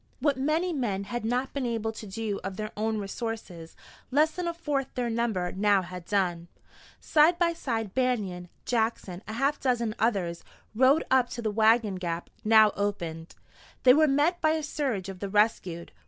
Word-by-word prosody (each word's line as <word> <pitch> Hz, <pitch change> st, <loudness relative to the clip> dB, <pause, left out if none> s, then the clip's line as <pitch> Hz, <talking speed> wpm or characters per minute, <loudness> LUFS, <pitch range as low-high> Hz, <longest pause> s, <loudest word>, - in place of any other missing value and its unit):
What 285 Hz, +1 st, +2 dB
many 310 Hz, +7 st, 0 dB
men 210 Hz, -9 st, -1 dB
had 240 Hz, +4 st, -4 dB
not 250 Hz, +4 st, -1 dB
been 275 Hz, -3 st, -2 dB
able 225 Hz, -1 st, -2 dB
to 220 Hz, -1 st, -9 dB
do 205 Hz, +1 st, -3 dB
of 190 Hz, 0 st, -5 dB
their 215 Hz, 0 st, -4 dB
own 220 Hz, +1 st, -1 dB
resources, 200 Hz, -5 st, -6 dB, 0.3 s
less 300 Hz, +4 st, +3 dB
than 355 Hz, +1 st, -4 dB
a 340 Hz, -, -1 dB
fourth 290 Hz, -5 st, -2 dB
their 245 Hz, -2 st, -1 dB
number 220 Hz, -6 st, -1 dB
now 200 Hz, 0 st, +2 dB
had 180 Hz, -1 st, -8 dB
done. 175 Hz, -4 st, 0 dB, 0.5 s
Side 315 Hz, +3 st, +4 dB
by 340 Hz, -1 st, +2 dB
side 225 Hz, -, -3 dB
Banion, 205 Hz, -9 st, -1 dB, 0.2 s
Jackson, 220 Hz, -6 st, -1 dB
a 215 Hz, -, -5 dB
half 275 Hz, +5 st, 0 dB
dozen 235 Hz, -4 st, 0 dB
others, 190 Hz, -7 st, 0 dB, 0.3 s
rode 265 Hz, +7 st, +4 dB
up 260 Hz, -2 st, +4 dB
to 240 Hz, -, -5 dB
the 215 Hz, -, 0 dB
wagon 220 Hz, -2 st, +3 dB
gap, 170 Hz, -2 st, -4 dB
now 220 Hz, -1 st, +6 dB
opened. 170 Hz, -5 st, -3 dB, 0.5 s
They 250 Hz, -, +8 dB
were 310 Hz, +2 st, +5 dB
met 295 Hz, +6 st, +2 dB
by 315 Hz, -1 st, +3 dB
a 315 Hz, -1 st, -2 dB
surge 260 Hz, -11 st, -2 dB
of 190 Hz, -2 st, -7 dB
the 200 Hz, -, -4 dB
rescued. 190 Hz, -5 st, 0 dB
225 Hz, 180 wpm, -27 LUFS, 195-265 Hz, 0.5 s, They